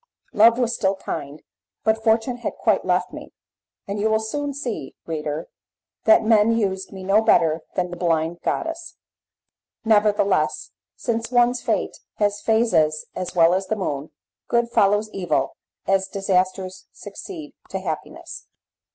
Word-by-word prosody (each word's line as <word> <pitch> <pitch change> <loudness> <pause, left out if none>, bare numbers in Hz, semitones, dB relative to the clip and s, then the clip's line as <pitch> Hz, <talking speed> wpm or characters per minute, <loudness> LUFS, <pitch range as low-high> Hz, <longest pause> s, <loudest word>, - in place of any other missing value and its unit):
Love 230 +2 +6
was 240 -2 +1
still 195 0 +1
kind, 145 -5 -6 0.4
but 220 0 +1
Fortune 225 +2 +2
had 240 - -4
quite - - +1
left - - 0
me, - - -9 0.6
and 200 +1 -3
you 215 +2 +1
will 220 0 +3
soon 285 +7 -3
see, 235 - -5
reader, 155 0 -4 0.6
that 220 - +6
men 220 0 +4
used 190 -3 -1
me 190 -1 -8
no 195 +3 +4
better 165 -6 +3
than 180 -1 -1
the - - -5
blind 165 -1 0
goddess. 330 0 -3 0.9
Nevertheless, 205 -6 +2 0.2
since 230 -1 -2
one's 245 0 +3
fate - - -1 0.2
has 205 -1 0
phases 175 -10 +2
as 180 0 -5
well 170 0 +5
as 190 +1 -1
the 220 - 0
moon, 150 -7 -3 0.4
good 235 0 +1
follows 205 -1 +3
evil 155 -8 -1 0.3
as 195 0 +2
disasters 185 -1 -1
succeed 310 -7 -9 0.2
to - - -3
happiness. - - -6
205 Hz, 145 wpm, -23 LUFS, 180-225 Hz, 0.9 s, Love